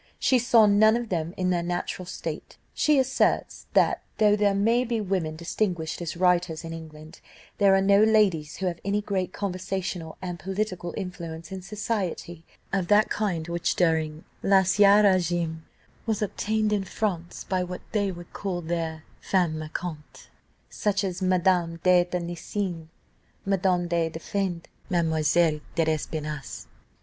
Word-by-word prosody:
She 255 Hz, -, +3 dB
saw 235 Hz, -2 st, +5 dB
none 215 Hz, +2 st, +5 dB
of 240 Hz, -2 st, -5 dB
them 170 Hz, -1 st, -2 dB
in 185 Hz, -1 st, +1 dB
their 175 Hz, -1 st, +1 dB
natural 175 Hz, +1 st, -3 dB
state. -, -, -6 dB, 0.2 s
She 300 Hz, -1 st, +3 dB
asserts 265 Hz, 0 st, +1 dB
that, -, -, +3 dB, 0.2 s
though 210 Hz, -1 st, +5 dB
there 205 Hz, -1 st, +2 dB
may 230 Hz, +5 st, +3 dB
be 235 Hz, -2 st, -1 dB
women 185 Hz, -6 st, -1 dB
distinguished 170 Hz, -1 st, -2 dB
as 170 Hz, 0 st, -4 dB
writers 175 Hz, -2 st, +2 dB
in 165 Hz, 0 st, -6 dB
England, 155 Hz, 0 st, -11 dB, 0.4 s
there 200 Hz, -1 st, +6 dB
are 195 Hz, -, +3 dB
no 200 Hz, +1 st, +5 dB
ladies 200 Hz, -9 st, +3 dB
who 190 Hz, -, -4 dB
have 175 Hz, -2 st, -2 dB
any 200 Hz, +1 st, 0 dB
great 195 Hz, -3 st, -2 dB
conversational 185 Hz, -4 st, -4 dB
and 175 Hz, -2 st, -5 dB
political 185 Hz, -1 st, -3 dB
influence 170 Hz, -4 st, -6 dB
in 190 Hz, -1 st, -5 dB
society, 195 Hz, -4 st, -4 dB, 0.3 s
of 190 Hz, -3 st, 0 dB
that 210 Hz, +3 st, +4 dB
kind 180 Hz, -7 st, -1 dB
which, 170 Hz, 0 st, -1 dB
during 160 Hz, -2 st, +1 dB, 0.2 s
l'ancien 200 Hz, +2 st, +5 dB
régime, 175 Hz, -4 st, +2 dB, 0.5 s
was 220 Hz, -1 st, 0 dB
obtained 215 Hz, +1 st, 0 dB
in 200 Hz, -2 st, +1 dB
France 185 Hz, -4 st, -3 dB
by 185 Hz, -1 st, 0 dB
what 180 Hz, 0 st, -6 dB
they 205 Hz, -2 st, 0 dB
would 175 Hz, -1 st, -11 dB
call 185 Hz, -3 st, -3 dB
their 160 Hz, -1 st, -3 dB, 0.2 s
femmes 175 Hz, -5 st, +1 dB
marquantes, 155 Hz, 0 st, -7 dB, 0.4 s
such 205 Hz, -1 st, -1 dB
as 185 Hz, -1 st, -3 dB
Madame 180 Hz, -2 st, +2 dB
de 180 Hz, -1 st, +5 dB
Tencin, 175 Hz, 0 st, -4 dB, 0.6 s
Madame 185 Hz, -2 st, +1 dB
du 170 Hz, -1 st, +1 dB
Deffand, 175 Hz, +1 st, -3 dB, 0.2 s
Mademoiselle 160 Hz, -2 st, +2 dB, 0.2 s
de 165 Hz, -, +2 dB
l'Espinasse. 155 Hz, -2 st, -3 dB
180 Hz, 145 wpm, -26 LUFS, 165-200 Hz, 0.6 s, there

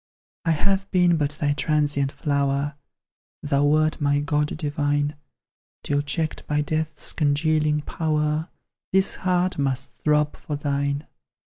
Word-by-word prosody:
I 165 Hz, -, +3 dB
have 195 Hz, +5 st, 0 dB
been 180 Hz, -2 st, +4 dB
but 145 Hz, -2 st, 0 dB
thy 145 Hz, -1 st, +2 dB
transient 145 Hz, -2 st, +1 dB
flower, 140 Hz, 0 st, 0 dB, 0.7 s
Thou 145 Hz, -1 st, +2 dB
wert 155 Hz, +1 st, +2 dB
my 145 Hz, 0 st, +2 dB
god 150 Hz, +1 st, 0 dB
divine; 145 Hz, -1 st, 0 dB, 0.7 s
Till 145 Hz, 0 st, +1 dB
checked 155 Hz, +2 st, -2 dB
by 150 Hz, 0 st, +1 dB
death's 155 Hz, +1 st, -1 dB
congealing 150 Hz, 0 st, +2 dB
power, 155 Hz, +1 st, -1 dB, 0.4 s
This 190 Hz, 0 st, +4 dB
heart 180 Hz, -2 st, 0 dB
must 135 Hz, -1 st, -1 dB
throb 150 Hz, -1 st, +1 dB
for 150 Hz, -, -5 dB
thine. 140 Hz, 0 st, -1 dB
150 Hz, 125 wpm, -24 LUFS, 145-155 Hz, 0.7 s, been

